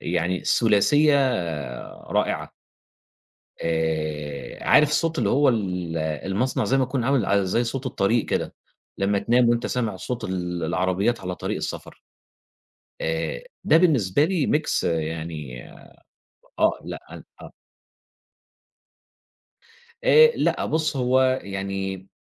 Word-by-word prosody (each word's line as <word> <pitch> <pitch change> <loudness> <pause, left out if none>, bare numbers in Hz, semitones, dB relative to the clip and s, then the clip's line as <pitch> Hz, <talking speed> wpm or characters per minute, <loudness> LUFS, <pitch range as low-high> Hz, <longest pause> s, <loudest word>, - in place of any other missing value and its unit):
يعني 90 +1 -1
ثلاثية 135 +7 +4 1.0
رائعة - - -1 1.1
آآ، 80 -3 -3
عارف 150 - +5
صوت 165 +1 0
اللي - - +1
هو 145 0 +4
ال 90 -7 -2
المصنع 95 - -1
زَيّ 135 - +2
ما 130 - +2
تكون 130 -2 -2
عامل 135 -4 +2
ع 100 0 +2
زَيّ 95 +6 +1
صوت 130 +3 -4
الطريق 115 -2 +1
كده، - - -2 0.4
لمّا 100 +1 +1
تنام 120 +2 +3
وأنت 120 0 +1
سامع 115 -5 -2
صوت 120 +5 -5
ال 90 -3 -3
العربيات 95 +7 0
على 90 -1 -4
طريق - - -3
السفر - - -6 1.0
آآ 80 -6 -2 0.2
ده 160 - +5
بالنسبة 145 - +3
لي 175 -4 0
mix 150 +1 +1
يعني 80 -5 -3 1.0
آه، - - +2
لأ، - - -6
ال - - -10 0.2
آه. - - -11 2.5
آآ 470 -1 +7
لأ، - - 0
بُصّ 155 -2 -1
هو 130 +1 +2
يعني، 95 -1 -4
100 Hz, 120 wpm, -24 LUFS, 85-130 Hz, 2.5 s, آآ